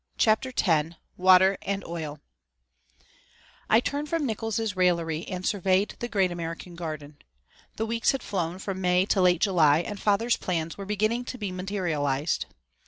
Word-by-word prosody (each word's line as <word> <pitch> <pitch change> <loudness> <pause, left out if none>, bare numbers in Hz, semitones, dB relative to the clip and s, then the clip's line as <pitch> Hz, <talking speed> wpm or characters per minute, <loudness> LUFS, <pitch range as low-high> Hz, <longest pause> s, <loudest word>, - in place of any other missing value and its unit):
CHAPTER 220 +4 +2
X 160 -2 +2 0.2
WATER 185 +1 +5
AND 200 -1 -3
OIL 155 -4 -6 1.5
I 220 - +6
turned 290 +4 -3
from 330 -3 0
Nickols' 225 -2 -2
raillery 170 -3 +1
and 185 -1 -5
surveyed 195 0 +1
the 240 - -3
great 195 -6 +1
American 170 +1 -6
garden. 155 -4 -7 0.6
The 220 - -2
weeks 230 +1 +1
had 270 -3 -4
flown 180 -3 -2
from 190 -1 -5
May 180 0 +3
to 195 -1 +1
late 180 -2 +4
July 160 -6 +4
and 200 +3 -6
father's 225 +3 +2
plans 165 -3 -2
were 200 - -7
beginning 215 +4 0
to 255 - -6
be 205 -5 -4
materialized. 165 -7 -1
185 Hz, 155 wpm, -26 LUFS, 170-210 Hz, 1.5 s, I